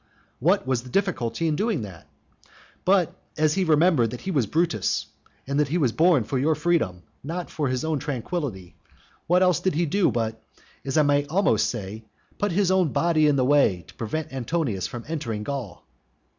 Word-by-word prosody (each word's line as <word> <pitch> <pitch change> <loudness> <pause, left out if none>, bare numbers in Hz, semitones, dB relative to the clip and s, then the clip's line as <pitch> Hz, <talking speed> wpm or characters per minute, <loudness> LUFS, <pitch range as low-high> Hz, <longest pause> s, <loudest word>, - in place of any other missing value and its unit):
What - - +2
was 130 -2 0
the 125 - -12
difficulty 165 - -1
of 155 - +1
doing 205 - 0
that? 95 -5 -10 0.8
But 185 -3 +3 0.2
as 155 0 +3
he 190 - +1
remembered 155 -6 +4
that 125 - -7
he 190 - -3
was 135 - +1
Brutus, 155 - 0 0.4
and 140 +2 -1
that 150 - +3
he 160 +6 0
was 135 -8 +2
born 165 -4 +4
for 130 +5 -2
your 155 +4 +2
freedom, 145 - 0 0.2
not 170 +5 -5
for 150 -3 -1
his 130 +2 -1
own 160 -2 0
tranquillity, 130 - -4 0.5
what 180 +2 +4
else 180 -4 +3
did 185 -5 0
he 170 +2 +2
do 190 +5 +2
but 115 -1 -2 0.4
as 135 +1 -2
I 155 - +6
may 145 0 +2
almost 155 - +2
say 110 -1 -6 0.4
put 205 - 0
his 185 +1 +2
own 185 -6 +2
body 155 +3 +3
in 145 - +3
the 130 -2 +2
way 125 - +3
to - - -14
prevent 135 +6 -4
Antonius 130 - -2
from 120 -1 -7
entering 115 -10 -3
Gaul? 130 -7 -6
145 Hz, 190 wpm, -25 LUFS, 120-170 Hz, 0.8 s, I